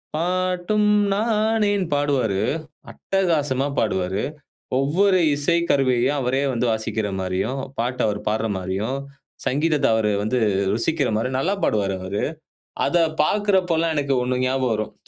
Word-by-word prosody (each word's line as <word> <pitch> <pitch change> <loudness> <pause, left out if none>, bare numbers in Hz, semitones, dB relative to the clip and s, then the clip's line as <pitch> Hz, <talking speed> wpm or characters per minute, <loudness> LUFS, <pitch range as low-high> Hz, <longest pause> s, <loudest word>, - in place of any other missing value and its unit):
பாட்டும் 185 +4 0 0.2
நானே 215 0 +1 0.2
பாடுவாரு. 135 -9 +1 0.5
அட்டகாசமா 150 -8 0
பாடுவாரு. 95 -2 0 0.6
ஒவ்வொரு 185 +8 +3 0.2
இசை 145 +4 +1
கருவியையும் 130 0 +2
அவரே 130 +1 0
வந்து 120 0 0
வாசிக்கிற 110 -1 -2
மாரியும், 95 +8 -2 0.2
பாட்டை 125 +2 -1
அவர் 105 -1 -1
பாடுற 110 +1 0
மாரியும், 95 +8 -2 0.5
சங்கீதத்தை 150 +2 +1
அவர் 110 -1 +1
வந்து 125 +4 0 0.3
ருசிக்கிற 140 +5 0
மாதிரி 115 +4 0
நல்லா 170 +9 +1
பாடுவாரு, 100 -2 +1
அவரு 95 +2 -3 0.6
அதை 175 - +2 0.2
பார்க்குறப்போலாம் 180 -4 +1
எனக்கு 140 -2 0
ஒண்ணு 125 0 -1
ஞாபகம் 130 -2 +1
வரும். 110 0 -3
135 Hz, 120 wpm, -22 LUFS, 110-170 Hz, 0.6 s, ஒவ்வொரு